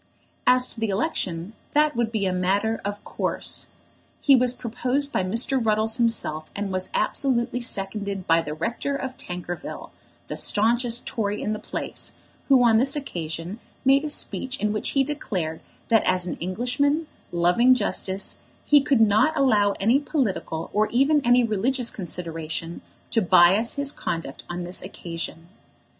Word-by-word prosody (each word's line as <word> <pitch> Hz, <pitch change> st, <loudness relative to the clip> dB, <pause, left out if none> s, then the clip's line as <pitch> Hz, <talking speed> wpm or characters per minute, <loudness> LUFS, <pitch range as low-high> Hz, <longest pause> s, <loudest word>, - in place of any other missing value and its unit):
As 250 Hz, 0 st, +6 dB
to -, -, -7 dB
the 225 Hz, -1 st, 0 dB
election, 195 Hz, -, -2 dB, 0.2 s
that 300 Hz, 0 st, +3 dB
would 235 Hz, -1 st, 0 dB
be 215 Hz, -3 st, -1 dB
a 185 Hz, -, 0 dB
matter 200 Hz, +5 st, 0 dB
of 205 Hz, 0 st, -4 dB
course. -, -, -2 dB, 0.5 s
He 275 Hz, -, +6 dB
was 250 Hz, -1 st, +3 dB
proposed 255 Hz, +4 st, -2 dB
by -, -, +1 dB
Mr. 230 Hz, +6 st, +1 dB
Ruddles 220 Hz, +1 st, +2 dB
himself, 230 Hz, -10 st, 0 dB
and 200 Hz, -1 st, -3 dB
was 185 Hz, 0 st, -3 dB
absolutely 245 Hz, -2 st, 0 dB
seconded 200 Hz, -3 st, -3 dB
by 165 Hz, 0 st, +4 dB
the 150 Hz, -2 st, -5 dB
rector 235 Hz, -, -2 dB
of 265 Hz, -1 st, -4 dB
Tankerville, 175 Hz, 0 st, -6 dB, 0.3 s
the -, -, -5 dB
staunchest 235 Hz, +2 st, +2 dB
Tory 205 Hz, -2 st, -2 dB
in 215 Hz, -, -2 dB
the 215 Hz, -, -4 dB
place, -, -, -5 dB, 0.3 s
who 265 Hz, -3 st, +6 dB
on 225 Hz, -2 st, +5 dB
this 270 Hz, +4 st, +1 dB
occasion 175 Hz, -, -5 dB, 0.3 s
made 275 Hz, +2 st, +5 dB
a 305 Hz, -, -2 dB
speech 265 Hz, -2 st, -2 dB
in 210 Hz, 0 st, 0 dB
which 215 Hz, -, -1 dB
he 270 Hz, -, +5 dB
declared 190 Hz, -, -3 dB, 0.3 s
that 225 Hz, -2 st, +5 dB
as 185 Hz, -1 st, +1 dB
an 180 Hz, -, -3 dB
Englishman, 250 Hz, -, 0 dB, 0.3 s
loving 180 Hz, +9 st, +4 dB
justice, 200 Hz, -4 st, -2 dB, 0.3 s
he 290 Hz, -1 st, +6 dB
could 275 Hz, -4 st, +2 dB
not 220 Hz, +9 st, +4 dB
allow 210 Hz, -7 st, +3 dB
any 230 Hz, +8 st, +2 dB
political 215 Hz, -, -2 dB
or 215 Hz, +1 st, +3 dB
even 275 Hz, +5 st, +3 dB
any 245 Hz, +1 st, +5 dB
religious 235 Hz, +3 st, 0 dB
consideration 165 Hz, -3 st, -5 dB, 0.3 s
to 225 Hz, -, +3 dB
bias 190 Hz, +5 st, +5 dB
his 280 Hz, 0 st, 0 dB
conduct 165 Hz, -, -5 dB
on 175 Hz, 0 st, -4 dB
this 180 Hz, +1 st, -5 dB
occasion. 165 Hz, -3 st, -7 dB
220 Hz, 155 wpm, -24 LUFS, 185-255 Hz, 0.5 s, As